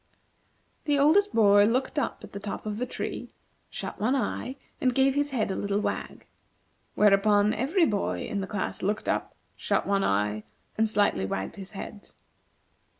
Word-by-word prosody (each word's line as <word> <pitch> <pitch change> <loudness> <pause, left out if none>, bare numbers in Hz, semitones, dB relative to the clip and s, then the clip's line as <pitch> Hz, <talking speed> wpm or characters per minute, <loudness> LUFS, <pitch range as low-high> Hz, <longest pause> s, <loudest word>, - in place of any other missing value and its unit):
The 290 -1 +2
oldest 360 +9 +4
boy 205 -2 +6
looked 255 +6 0
up - - -3
at - - -10
the 200 - -6
top 205 +1 -6
of 210 0 -3
the 250 - -2
tree, - - -5 0.4
shut - - -6
one 245 +6 +2
eye, 260 0 -2 0.3
and 255 -2 +2
gave 270 0 +4
his 290 +1 0
head 235 -7 -1
a - - -2
little 200 0 -1
wag. - - -4 0.7
Whereupon 205 0 +4
every 320 - +2
boy 205 -6 -1
in 200 - -3
the 190 - -4
class 205 -2 -3
looked 210 +3 -1
up, - - -1 0.2
shut - - 0
one 200 0 +1
eye, 105 +1 0 0.3
and 220 0 +2
slightly 200 - +1
wagged 95 - -4
his 195 +1 -9
head. 205 +1 -8
210 Hz, 170 wpm, -27 LUFS, 200-260 Hz, 0.7 s, boy